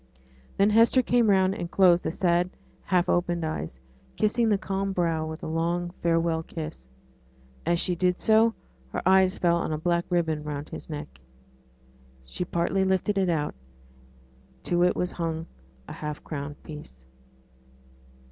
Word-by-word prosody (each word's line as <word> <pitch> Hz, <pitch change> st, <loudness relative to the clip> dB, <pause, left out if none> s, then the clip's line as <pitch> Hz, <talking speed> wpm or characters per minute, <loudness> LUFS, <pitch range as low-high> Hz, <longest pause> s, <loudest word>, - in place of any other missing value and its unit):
Then 200 Hz, +2 st, +4 dB
Hester 230 Hz, +4 st, +5 dB
came 240 Hz, -2 st, +3 dB
round 190 Hz, -1 st, +4 dB
and 175 Hz, -5 st, -5 dB
closed 180 Hz, -2 st, +4 dB
the -, -, -1 dB
sad 175 Hz, +1 st, +1 dB, 0.4 s
half 180 Hz, -2 st, +2 dB
open 175 Hz, -1 st, +1 dB
eyes; 80 Hz, -, -4 dB, 0.4 s
kissing 225 Hz, +2 st, +2 dB
the 205 Hz, -, +3 dB
calm 195 Hz, 0 st, -2 dB
brow 165 Hz, -3 st, 0 dB
with 160 Hz, +1 st, -7 dB
a -, -, -3 dB
long 170 Hz, +2 st, -1 dB
farewell 165 Hz, -1 st, +1 dB
kiss. 155 Hz, -, -8 dB, 0.8 s
As 170 Hz, 0 st, +2 dB
she 180 Hz, -, 0 dB
did 180 Hz, +1 st, +1 dB
so, 225 Hz, +1 st, +4 dB, 0.4 s
her -, -, -2 dB
eye 190 Hz, 0 st, +6 dB
fell 175 Hz, -2 st, +1 dB
on 170 Hz, -, -2 dB
a 155 Hz, -, -1 dB
black 170 Hz, +2 st, 0 dB
ribbon 160 Hz, -4 st, 0 dB
round 150 Hz, 0 st, -5 dB
his -, -, -8 dB
neck. 105 Hz, -, -7 dB, 1.1 s
She 65 Hz, -, -4 dB
partly 175 Hz, +2 st, 0 dB
lifted 190 Hz, +2 st, +1 dB
it 190 Hz, -2 st, +1 dB
out; 150 Hz, -3 st, 0 dB, 1.1 s
to 175 Hz, 0 st, +1 dB
it 180 Hz, -, +3 dB
was 180 Hz, -, -1 dB
hung 165 Hz, -1 st, -3 dB, 0.4 s
a -, -, -7 dB
half 150 Hz, -1 st, -6 dB
crown 145 Hz, -1 st, -5 dB
piece. 150 Hz, -, -11 dB
175 Hz, 155 wpm, -26 LUFS, 160-190 Hz, 1.1 s, eye